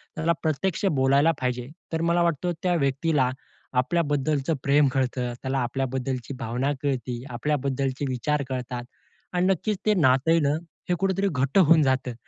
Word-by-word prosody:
त्याला 165 Hz, 0 st, +1 dB
प्रत्यक्ष 180 Hz, +6 st, 0 dB
बोलायला 140 Hz, +4 st, +4 dB
पाहिजे. 125 Hz, -1 st, -2 dB, 0.3 s
तर 160 Hz, -, 0 dB
मला 170 Hz, +1 st, +2 dB
वाटतं 170 Hz, +1 st, 0 dB
त्या 180 Hz, -1 st, +2 dB
व्यक्तीला 140 Hz, -2 st, +1 dB, 0.5 s
आपल्याबद्दलचं 145 Hz, 0 st, 0 dB
प्रेम 140 Hz, +1 st, +4 dB
कळतं. 125 Hz, -2 st, -1 dB
त्याला 135 Hz, 0 st, -1 dB
आपल्याबद्दलची 130 Hz, +1 st, -2 dB
भावना 130 Hz, +3 st, -1 dB
कळती. 125 Hz, -3 st, -2 dB
आपल्याबद्दलचे 135 Hz, +1 st, -1 dB
विचार 140 Hz, +4 st, -1 dB
कळतात 125 Hz, -1 st, -4 dB, 0.5 s
आणि 180 Hz, +1 st, +2 dB
नक्कीच 195 Hz, +3 st, 0 dB
ते 215 Hz, -, +5 dB
नातं 135 Hz, -1 st, +3 dB
आहे 165 Hz, -, +5 dB
ना, 145 Hz, -1 st, +2 dB, 0.4 s
हे 180 Hz, -, +3 dB
कुठेतरी 195 Hz, +1 st, +1 dB
घट्ट 140 Hz, +4 st, 0 dB
होऊन 165 Hz, -3 st, +6 dB
जातं. 130 Hz, -2 st, 0 dB
140 Hz, 145 wpm, -25 LUFS, 130-165 Hz, 0.5 s, होऊन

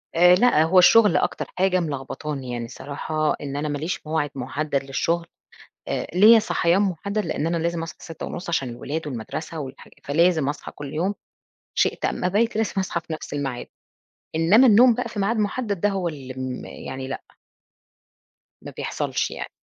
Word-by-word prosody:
آآ، 180 Hz, +1 st, +7 dB
لأ، 195 Hz, -6 st, +4 dB
هو 180 Hz, +3 st, +5 dB
الشغل 210 Hz, +3 st, +6 dB
أكتر -, -, -1 dB
حاجة 185 Hz, 0 st, +3 dB
ملخبطاني 140 Hz, -3 st, -4 dB
يعني، 120 Hz, -1 st, -3 dB
الصراحة 145 Hz, +5 st, -2 dB
إن 140 Hz, -1 st, -5 dB
أنا 150 Hz, +1 st, -2 dB
ما 145 Hz, -, -2 dB
ليش 155 Hz, +1 st, -4 dB
موعد 155 Hz, -2 st, 0 dB
محدد 140 Hz, +2 st, -2 dB
للشغل. 165 Hz, +5 st, -1 dB, 0.6 s
آآ، -, -, -2 dB
ليّا 220 Hz, +4 st, +8 dB
صحيان 180 Hz, -2 st, +2 dB
محدد 200 Hz, +2 st, -1 dB
لإن 150 Hz, -, -1 dB
أنا 170 Hz, 0 st, 0 dB
لازم 170 Hz, 0 st, -1 dB
أصحى 165 Hz, -, -8 dB
06:30 165 Hz, +2 st, -7 dB
عشان 135 Hz, -6 st, 0 dB
الولاد 150 Hz, +6 st, -5 dB
والمدرسة 150 Hz, +6 st, -5 dB
والحاج 135 Hz, -2 st, -9 dB
فلازم 160 Hz, 0 st, +2 dB
أصحى 145 Hz, -, -6 dB
كل 145 Hz, -1 st, -7 dB
يوم 180 Hz, +6 st, 0 dB, 0.6 s
شِئت -, -, +1 dB
أم -, -, -2 dB
أبيْت 210 Hz, +6 st, +1 dB
لازم 220 Hz, 0 st, 0 dB
أصحى 185 Hz, -2 st, -1 dB
في 165 Hz, -, -7 dB
نفس 155 Hz, -, -7 dB
الميعاد. 135 Hz, -4 st, -3 dB, 0.7 s
إنما 190 Hz, +11 st, +5 dB
النوم 240 Hz, +2 st, +7 dB
بقى 250 Hz, +1 st, -3 dB
في 220 Hz, -2 st, -8 dB
ميعاد 215 Hz, +4 st, +1 dB
محدد 210 Hz, -2 st, -1 dB
دا 205 Hz, -, +3 dB
هو 190 Hz, -3 st, -1 dB
اللي 135 Hz, -5 st, -8 dB
م 130 Hz, -1 st, -4 dB
يعني 130 Hz, 0 st, -7 dB
لأ. -, -, -5 dB, 1.4 s
ما -, -, -9 dB
بيحصلش -, -, -2 dB
يعني. -, -, -6 dB
165 Hz, 170 wpm, -23 LUFS, 145-190 Hz, 1.4 s, ليّا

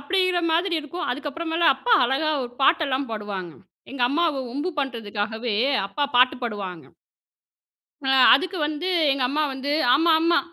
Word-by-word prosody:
அப்படின்கிற 365 Hz, +3 st, 0 dB
மாதிரி 345 Hz, +2 st, +1 dB
இருக்கும். 325 Hz, +4 st, -6 dB
அதுக்கு 290 Hz, +3 st, -4 dB
அப்புறமேல 330 Hz, +2 st, 0 dB
அப்பா 485 Hz, -2 st, +1 dB
அழகா 275 Hz, +5 st, 0 dB
ஒரு 245 Hz, -, -10 dB
பாட்டெல்லாம் 275 Hz, -3 st, +1 dB
பாடுவாங்க. 200 Hz, -5 st, -6 dB, 0.4 s
எங்க 265 Hz, -3 st, -3 dB
அம்மாவ 305 Hz, -3 st, 0 dB
வம்பு 290 Hz, +8 st, -3 dB
பண்றதுக்காகவே, 225 Hz, -2 st, -4 dB, 0.3 s
அப்பா 290 Hz, +9 st, -4 dB
பாட்டு 255 Hz, +1 st, +5 dB
பாடுவாங்க. 195 Hz, -7 st, -5 dB, 1.2 s
அ -, -, 0 dB, 0.2 s
அதுக்கு 370 Hz, +7 st, 0 dB
வந்து 310 Hz, +4 st, -4 dB, 0.2 s
எங்க 270 Hz, -2 st, -1 dB
அம்மா 305 Hz, +2 st, 0 dB
வந்து, 270 Hz, +2 st, -4 dB, 0.2 s
"ஆமா, 325 Hz, +4 st, +3 dB
ஆமா 335 Hz, +2 st, +3 dB
280 Hz, 145 wpm, -23 LUFS, 240-330 Hz, 1.2 s, பாட்டு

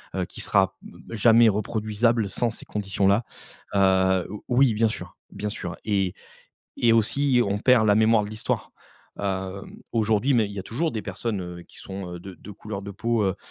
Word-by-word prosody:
heu, -, -, -1 dB
qui -, -, -9 dB
sera -, -, +2 dB
b -, -, -13 dB
jamais 115 Hz, +1 st, +6 dB
reproduisable 110 Hz, +1 st, 0 dB
sans 120 Hz, +4 st, +1 dB
ces 115 Hz, -, -7 dB
conditions-là, 100 Hz, +1 st, +1 dB, 0.5 s
heu, 95 Hz, -1 st, +3 dB
o 105 Hz, -, -8 dB
oui 125 Hz, -1 st, +4 dB
bien 110 Hz, +1 st, +3 dB
sûr, 110 Hz, -, -6 dB, 0.2 s
bien 105 Hz, -, -4 dB
sûr 90 Hz, -5 st, -5 dB
et 100 Hz, -4 st, 0 dB, 0.6 s
et 115 Hz, -1 st, +4 dB
aussi, 125 Hz, +4 st, +3 dB
on 100 Hz, +1 st, 0 dB
perd 120 Hz, -2 st, +4 dB
la 105 Hz, -, +5 dB
mémoire 110 Hz, 0 st, +4 dB
de 105 Hz, -, -7 dB
l'histoire. 110 Hz, 0 st, -3 dB, 0.5 s
Heu, 95 Hz, -1 st, -3 dB, 0.3 s
aujourd'hui, 110 Hz, +3 st, +2 dB
mais 115 Hz, -3 st, +3 dB
il -, -, -9 dB
y 100 Hz, -, -7 dB
a 95 Hz, -, -5 dB
toujours 155 Hz, +11 st, -1 dB
des 110 Hz, -3 st, -4 dB
personnes, 110 Hz, -1 st, -3 dB
heu, 90 Hz, -1 st, -7 dB
qui -, -, -20 dB
sont, 95 Hz, -2 st, -7 dB
heu, -, -, -6 dB
de 95 Hz, +1 st, -9 dB
de 90 Hz, +5 st, -12 dB
couleur 105 Hz, 0 st, -7 dB
de 100 Hz, -, -7 dB
peau, 115 Hz, +3 st, 0 dB
heu, 95 Hz, -, 0 dB
105 Hz, 195 wpm, -25 LUFS, 95-115 Hz, 0.6 s, jamais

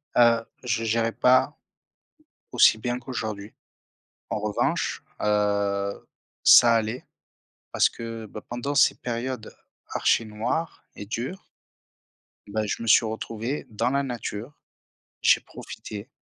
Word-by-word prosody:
Heu, 115 Hz, -1 st, +5 dB, 0.2 s
je 115 Hz, -2 st, -1 dB
gérais 115 Hz, +1 st, +1 dB
pas 130 Hz, +4 st, +3 dB, 1.0 s
aussi 120 Hz, -3 st, +6 dB
bien 120 Hz, +2 st, -2 dB
qu'aujourd'hui. 110 Hz, -5 st, -5 dB, 0.8 s
En -, -, -2 dB
revanche, 105 Hz, 0 st, -1 dB, 0.2 s
heu, 100 Hz, -1 st, 0 dB, 0.4 s
ça 120 Hz, -1 st, +8 dB
allait 115 Hz, +2 st, -2 dB, 0.7 s
parce -, -, +4 dB
que, 115 Hz, -1 st, -7 dB
bah, 105 Hz, 0 st, -9 dB
pendant 120 Hz, +4 st, -3 dB
ces -, -, +5 dB
périodes 120 Hz, -1 st, -4 dB, 0.3 s
archi-noires 115 Hz, +9 st, -1 dB
et 105 Hz, -, -8 dB
dures, 125 Hz, -, -5 dB, 1.0 s
bah, 110 Hz, +1 st, -2 dB
je 105 Hz, -, -3 dB
me 115 Hz, -, -5 dB
suis 115 Hz, -, +6 dB
retrouvé 115 Hz, +4 st, -4 dB
dans 110 Hz, +2 st, 0 dB
la 140 Hz, +2 st, +1 dB
nature. 120 Hz, 0 st, -5 dB, 0.6 s
J'ai -, -, +5 dB
profité, 105 Hz, +4 st, -9 dB
115 Hz, 115 wpm, -25 LUFS, 105-125 Hz, 1.0 s, ça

